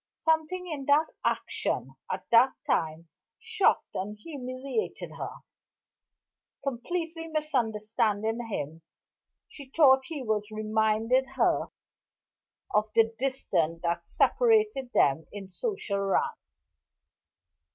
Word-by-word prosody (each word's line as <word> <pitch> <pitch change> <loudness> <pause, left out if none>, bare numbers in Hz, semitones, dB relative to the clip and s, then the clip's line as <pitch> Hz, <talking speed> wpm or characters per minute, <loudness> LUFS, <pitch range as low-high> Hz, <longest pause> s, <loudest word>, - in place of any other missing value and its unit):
Something 320 +3 0
in 295 -5 -5
that 295 +3 +3
action, - - -1 0.2
at - - -4
that 240 +3 +6
time, 160 - -1 0.3
shocked 445 -3 +1
and 210 +3 -4
humiliated 265 - -4
her. - - -5 1.3
Completely 325 +6 -3
misunderstanding 225 -6 0
him, 160 -6 -4 0.7
she 280 -3 -11
thought 265 -3 +5
he 300 -4 -5
was 215 -2 -1
reminding 220 +3 +1
her - - +2 1.1
of 215 +1 +2
the 225 0 +4
distance 175 -11 0
that 170 0 -1
separated 430 - +3
them 145 - +3
in 200 -2 -8
social 235 - -2
rank. 195 -1 +1
245 Hz, 100 wpm, -28 LUFS, 210-305 Hz, 1.3 s, that